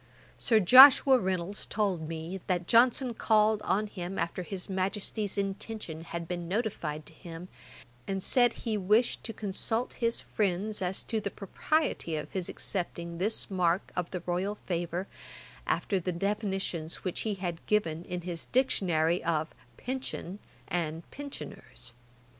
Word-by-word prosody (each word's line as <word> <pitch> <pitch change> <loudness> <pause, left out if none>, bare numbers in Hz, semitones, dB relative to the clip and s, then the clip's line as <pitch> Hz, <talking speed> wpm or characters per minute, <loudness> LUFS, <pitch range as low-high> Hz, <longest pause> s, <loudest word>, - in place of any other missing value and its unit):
Sir 225 -2 +4
Joshua 260 +5 +9
Reynolds 185 0 -2
told 190 -7 -1
me, 165 +3 -5
that 180 -2 0
Johnson 245 +4 +4
called 215 -1 +3
on 210 +1 +1
him 190 -2 -6
after 170 +2 -2
his 180 0 -5
Majesty's 195 +2 -2
intention 195 -4 -4
had 170 0 -5
been 175 -1 -4
notified 170 -7 -2
to 160 - -12
him, 170 +1 -9 0.6
and 195 -1 -2
said 245 -3 +3
he 220 -2 0
wished 210 +5 +2
to 225 - -4
consult 220 +3 -1
his 230 -1 0
friends 205 +1 -1
as 185 +1 -1
to 220 -1 -2
the 200 - -2
propriety 200 - -1
of 150 - -5
his 185 -2 -2
accepting 170 -2 -4
this 210 +2 -1
mark 180 -1 +1
of 180 -1 -2
the 180 - -4
royal 185 +4 -1
favour, 175 +1 -2 0.6
after 195 - +1
the 180 +1 -2
definitions 190 -3 -2
which 185 - -2
he 215 -2 -1
had 175 -3 -4
given 170 -6 +1
in 180 -1 -4
his 170 -2 -5
Dictionary 175 -10 +2
of 160 -1 0 0.2
pension 250 -7 -5 0.3
and 165 -1 -2
pensioners. 150 - -9
190 Hz, 145 wpm, -30 LUFS, 170-215 Hz, 0.6 s, Joshua